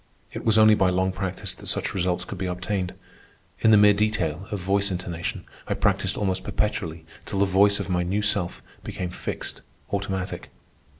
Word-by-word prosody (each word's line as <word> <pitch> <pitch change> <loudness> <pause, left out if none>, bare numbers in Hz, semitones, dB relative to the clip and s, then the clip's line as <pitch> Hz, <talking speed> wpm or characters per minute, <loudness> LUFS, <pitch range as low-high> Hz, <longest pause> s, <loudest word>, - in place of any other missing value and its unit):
It - - -5
was 110 -1 +3
only 110 0 +7
by 95 -3 +3
long 95 +1 +1
practice 95 -1 -3
that - - -12
such - - -1
results 90 -1 0
could - - -7
be 95 - -1
obtained. 90 +1 -2 0.6
In 110 - +4
the 110 - +8
mere 105 0 +7
detail 100 -5 0
of 105 -2 -3
voice 100 +2 +1
intonation 90 -2 -4 0.2
I - - 0
practised - - +1
almost 95 -2 -1
perpetually 85 -7 -2 0.2
till 100 - -3
the 100 - +4
voice 100 +1 +4
of 100 - -3
my 90 -2 +1
new 95 +4 0
self 100 -4 0 0.2
became 95 -4 -4
fixed, - - -5 0.3
automatic. 95 -2 -3
95 Hz, 180 wpm, -25 LUFS, 90-105 Hz, 0.6 s, the